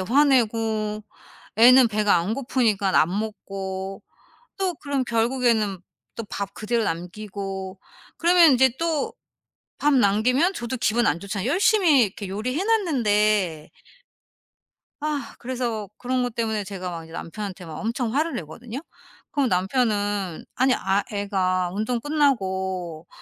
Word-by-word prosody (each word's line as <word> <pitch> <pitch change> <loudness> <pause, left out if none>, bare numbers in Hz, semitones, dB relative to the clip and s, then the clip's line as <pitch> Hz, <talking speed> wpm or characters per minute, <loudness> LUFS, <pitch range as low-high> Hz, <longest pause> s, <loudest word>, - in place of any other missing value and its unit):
화내고 225 -3 +2 0.5
애는 250 +2 +7
배가 210 -2 +2
안 180 +6 0
고프니까 225 -7 +1
안 155 - +3
먹고 195 -3 -5 0.6
또 380 -2 0
그럼 280 -3 -2
결국에는 230 -4 +1 0.4
또 230 - -4
밥 200 -1 -4
그대로 230 +2 -1
남기고 190 +2 -5 0.4
그러면 340 -2 +6
인제 260 -1 +4
또 325 -4 -1 0.7
밥 295 -1 +3
남기면 250 - +3
저도 240 -2 -4
기분 235 0 +1
안 170 - +1
좋잖아요, 200 +3 -3
열심히 355 - +4
이렇게 200 -1 -2
요리해 250 - -2
놨는데. 215 - +1 1.3
아 290 -5 -3
그래서 240 -4 -3
그런 255 0 -1
거 245 - -1
때문에 220 -2 -2
제가 190 -2 -6
막 165 -1 -6
이제 160 0 -14
남편한테 185 +2 -6
막 160 -2 -8
엄청 230 +1 -2
화를 315 +4 0
내거든요. 220 - -7 0.5
그럼 280 -3 +1
남편은 205 -2 0
"아니 260 +1 +3
아 195 +2 +1
애가 190 -3 0
운동 220 +4 -1
끝나고 190 - -1
220 Hz, 270 characters per minute, -24 LUFS, 195-260 Hz, 1.3 s, 애는